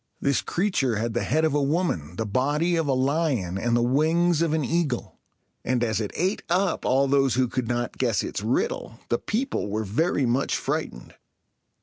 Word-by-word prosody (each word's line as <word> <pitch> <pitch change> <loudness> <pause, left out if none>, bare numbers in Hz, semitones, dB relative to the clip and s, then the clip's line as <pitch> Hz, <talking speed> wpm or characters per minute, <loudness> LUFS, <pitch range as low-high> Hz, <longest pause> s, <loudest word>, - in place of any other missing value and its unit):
This 140 -7 +1
creature 145 - 0
had 115 +2 -2
the 120 - 0
head 160 +1 +1
of 155 - +1
a 145 - +2
woman, 140 - -1
the 110 - -2
body 145 - +1
of 165 -2 0
a 135 - +2
lion, 130 - 0
and 120 +3 +1
the 120 - +2
wings 160 +6 +2
of 165 -2 +1
an 155 -3 0
eagle; 155 -7 -2 0.4
and, 125 0 0
as 110 -2 0
it 105 - -2
ate 185 +5 0
up 185 +2 +1
all 135 +2 +3
those 135 -2 +2
who 130 0 +2
could 125 -1 -3
not 120 0 -2
guess 120 -5 +1
its - - -4
riddle, 115 - -2
the 120 - +1
people 235 - -2
were 110 +2 -1
very 140 - +1
much 125 +3 +1
frightened. - - -4
135 Hz, 195 wpm, -25 LUFS, 120-160 Hz, 0.4 s, all